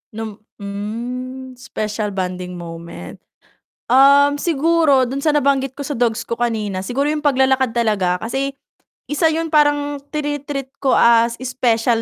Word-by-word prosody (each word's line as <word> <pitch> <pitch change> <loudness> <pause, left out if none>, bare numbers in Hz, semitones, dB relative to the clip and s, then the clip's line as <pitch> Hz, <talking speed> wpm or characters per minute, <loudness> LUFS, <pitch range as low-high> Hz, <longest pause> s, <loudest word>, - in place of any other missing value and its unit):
Nom 220 -2 -6 0.2
mhm, 245 +6 -6
special 215 -5 -4
bonding 180 -1 -4
moment, 165 - -9 0.7
um, 280 +2 +6
siguro 320 -3 +3
do'n 255 +2 -2
sa 295 +2 +1
nabanggit 275 -2 +1
ko 285 - -6
sa 280 -2 -4
dogs 230 -2 +1
ko 235 - -5
kanina 215 -5 -1
siguro 265 +9 -1
yung 300 -1 -2
paglalakad 265 -3 +2
talaga 200 -6 0
kasi, 270 +4 -2 0.5
isa 320 +2 +1
'yun 320 0 -2
parang 290 -1 +2
trini-treat 290 -2 -4
ko 270 - +3
as 235 0 +4
special 235 -2 +1
255 Hz, 135 wpm, -19 LUFS, 220-285 Hz, 0.7 s, um